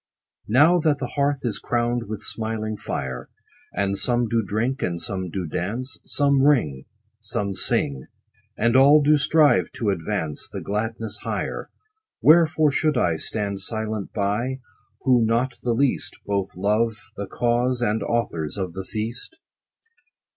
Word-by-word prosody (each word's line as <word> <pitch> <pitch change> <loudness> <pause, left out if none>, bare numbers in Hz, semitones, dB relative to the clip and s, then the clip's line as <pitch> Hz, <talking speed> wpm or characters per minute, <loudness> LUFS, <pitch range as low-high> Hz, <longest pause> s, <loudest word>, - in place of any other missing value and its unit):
Now 150 +10 +5
that 155 -3 +2
the 130 -3 -4
hearth 140 -1 0
is 115 -4 -1
crown'd 120 -1 -1
with 110 -1 -5
smiling 110 -1 -3
fire, 65 -10 -5 0.4
And 100 +1 -1
some 120 -1 +2
do 115 0 +1
drink, 115 +6 -2
and 85 -1 -2
some 95 +1 -2
do 90 +1 -4
dance, 115 - -3
Some 140 -1 +3
ring, 115 - +2 0.3
Some 100 -1 -2
sing, 70 -7 +1 0.5
And 115 +2 +2
all 145 +3 +7
do 150 +2 +5
strive 150 +1 +3
to 105 -4 0
advance 80 -4 -2
The - - -6
gladness 110 +2 -3
higher; - - -4 0.5
Wherefore 155 -1 +5
should 150 0 +1
I 85 -8 +2
Stand 100 +2 -2
silent 110 0 -3
by, 115 +6 -1 0.4
Who 125 -3 +4
not 120 +3 +1
the 120 - 0
least, 135 +2 0
Both 100 -2 -2
love 105 +3 0
the 100 0 -5
cause, 120 +1 0
and 110 -1 0
authors 95 -9 -2
of 95 -3 -3
the 95 - -5
feast 115 - -5
115 Hz, 145 wpm, -23 LUFS, 100-130 Hz, 0.5 s, all